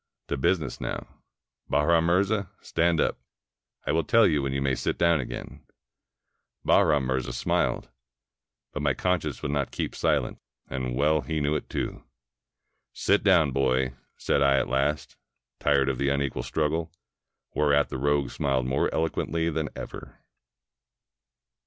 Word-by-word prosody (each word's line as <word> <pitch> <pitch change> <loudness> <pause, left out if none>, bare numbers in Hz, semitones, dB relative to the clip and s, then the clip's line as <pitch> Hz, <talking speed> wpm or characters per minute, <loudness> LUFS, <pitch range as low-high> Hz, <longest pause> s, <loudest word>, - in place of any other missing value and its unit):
To - - 0
business 75 +1 0
now.... - - -6 0.5
Bahram 80 +2 +3
Mirza, 100 +2 +1
stand 85 0 +1
up. - - +1 0.7
I - - 0
will 80 +2 +2
teU 115 0 +4
you 75 -7 +3
when 70 0 -2
you 70 - -1
may 70 -1 +1
sit - - -1
down 85 -2 +3
again." 65 - -7 1.0
Bahram 75 -3 +4
Mirza 65 0 -1
smiled. - - 0 0.9
But 75 - -3
my 70 -3 +1
conscience 80 -7 -1
would 75 - -1
not 70 -2 -1
keep - - -3
silent, - - 0 0.3
and 65 -2 -3
well 75 +3 +2
he 75 +4 -2
knew 75 +1 0
it - - -4
too! - - -4 0.9
"Sit 100 +1 +2
down, 85 -8 +4
boy," 65 -1 +1 0.2
said - - +1
I 70 -1 +4
at 65 - +1
last, 70 +2 -1 0.4
tired 70 -2 +3
of 65 -2 -1
the 70 - +1
unequal 70 -3 -1
struggle; 80 +5 -1 0.6
whereat 75 -1 +3
the 65 - -4
rogue 70 0 +1
smiled 65 -3 0
more 65 +2 +1
eloquently 80 +1 -1
than 80 -1 -2
ever. - - -8
75 Hz, 145 wpm, -27 LUFS, 70-80 Hz, 1.0 s, teU